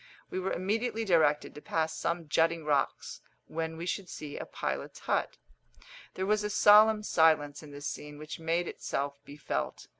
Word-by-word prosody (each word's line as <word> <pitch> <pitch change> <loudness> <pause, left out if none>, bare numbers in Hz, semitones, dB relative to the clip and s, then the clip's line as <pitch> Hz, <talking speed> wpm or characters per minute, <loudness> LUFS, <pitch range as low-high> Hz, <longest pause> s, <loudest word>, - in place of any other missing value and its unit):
We 185 - -2
were 185 +1 -2
immediately 225 +4 -1
directed 155 -6 +3
to 150 - -10
pass 160 0 -1
some 170 -1 -2
jutting 165 +2 +2
rocks, 145 -2 -1 0.2
when 160 0 -4
we 170 - -5
should 180 0 -3
see 150 -2 -7
a - - -6
pilot's - - -4
hut. - - -1 0.8
There 190 - -2
was 210 +1 +2
a 210 - -1
solemn 210 +1 +6
silence 155 -6 +3
in 155 - -11
this 145 0 -9
scene 150 0 -5
which 155 +2 -7
made 165 +2 0
itself 140 0 -4
be 145 - -11
felt. 150 - -3
165 Hz, 175 wpm, -30 LUFS, 150-190 Hz, 0.8 s, solemn